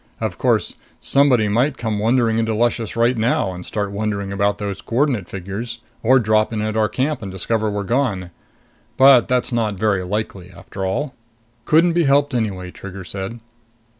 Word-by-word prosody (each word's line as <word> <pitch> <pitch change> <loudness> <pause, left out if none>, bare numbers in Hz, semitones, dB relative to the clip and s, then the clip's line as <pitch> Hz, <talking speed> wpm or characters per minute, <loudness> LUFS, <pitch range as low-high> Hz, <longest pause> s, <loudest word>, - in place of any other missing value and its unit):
Of - - -3
course, - - +1 0.3
somebody 130 -6 +3
might 125 +7 +1
come 110 -3 -2
wandering 115 0 +2
into 115 -1 0
Luscious 115 0 0
right 115 +2 +2
now 110 -4 0
and 90 0 -8
start 100 0 -3
wondering 100 -1 -3
about 100 +1 +1
those 100 -2 -4
coordinate 120 -5 0
figures, 100 +5 -5 0.2
or 130 +4 +5
drop 110 -2 +2
in 110 - -2
at 110 0 -2
our 110 -1 +2
camp 130 +4 -1
and 100 -3 -6
discover 110 +3 -1
we're 105 0 -2
gone. 100 -6 -1 0.7
But 130 -2 +7
that's 125 +1 0
not 110 -3 0
very 100 -1 0
likely, 95 -2 -4
after 95 +1 -8
all." 125 +10 -2 0.5
"Couldn't 165 +2 +4
be 170 -1 +2
helped 140 0 +3
anyway," 95 -6 -2
Trigger 95 0 -9
said. 100 +6 -6
110 Hz, 170 wpm, -20 LUFS, 100-125 Hz, 0.7 s, But